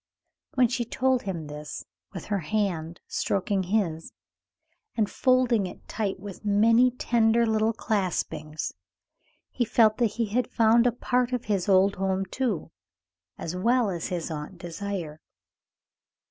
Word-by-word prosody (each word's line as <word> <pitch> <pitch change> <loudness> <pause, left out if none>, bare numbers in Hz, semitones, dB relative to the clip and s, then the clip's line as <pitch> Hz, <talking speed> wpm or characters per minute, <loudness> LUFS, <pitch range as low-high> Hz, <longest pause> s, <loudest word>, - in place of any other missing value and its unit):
When 255 -2 +5
she 240 +1 -1
told 255 +2 +1
him 175 -5 -4
this, 150 0 -7 0.3
with - - -7
her 205 -2 -1
hand 170 -3 -2
stroking 195 0 -1
his 180 -4 -1 0.9
and 215 -2 +2
folding 250 -4 +2
it - - -12
tight 200 -4 -2
with 200 0 -9
many 225 +4 +5
tender 235 -1 +2
little 220 0 +2
claspings, 170 -8 -2 0.8
he 245 - 0
felt 220 -1 +4
that 235 -4 +2
he 230 - +1
had 245 +3 0
found 230 0 +4
a - - +3
part 250 +1 0
of 250 -1 -2
his 200 -3 0
old 195 +1 +4
home, 190 0 0
too, 215 -3 -2 0.7
as 165 +2 -5
well 235 +3 +2
as 170 +1 -4 0.2
Aunt 150 +4 -6
Désiré. 175 -2 -5
205 Hz, 135 wpm, -26 LUFS, 180-235 Hz, 0.9 s, When